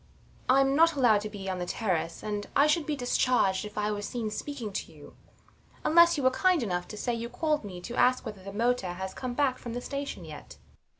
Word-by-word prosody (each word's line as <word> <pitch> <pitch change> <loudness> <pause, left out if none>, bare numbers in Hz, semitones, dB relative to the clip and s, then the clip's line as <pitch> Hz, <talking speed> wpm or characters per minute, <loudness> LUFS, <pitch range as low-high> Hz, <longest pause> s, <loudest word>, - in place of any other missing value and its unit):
I'm 270 +1 +4
not 330 +2 +5
allowed 235 -7 +4
to 215 - -5
be 200 -2 -8
on 185 -1 -2
the 175 - -3
terrace; 175 -7 -2
and 210 -1 -3
I 285 - +6
should 300 +1 +2
be 300 - 0
discharged 245 -6 +1
if 210 0 -10
I 210 0 0
were 205 -1 -3
seen 220 +1 -3
speaking 235 -3 -5
to - - -4
you, - - -15 0.7
unless 340 +1 +6
you 280 - -2
were 260 - +5
kind 360 +2 +2
enough 180 -4 -2
to 210 - -8
say 240 +3 -1
you 235 0 -4
called 300 +3 0
me 185 -3 -7
to 235 +6 -6
ask 255 +1 +3
whether 210 -4 -7
the 195 - -7
motor 230 -3 0
has 190 +1 -5
come 250 -2 -5
back 265 -2 +1
from 235 - -6
the 245 - -3
station 280 +2 -5
yet. - - -10
235 Hz, 230 wpm, -28 LUFS, 205-275 Hz, 0.7 s, I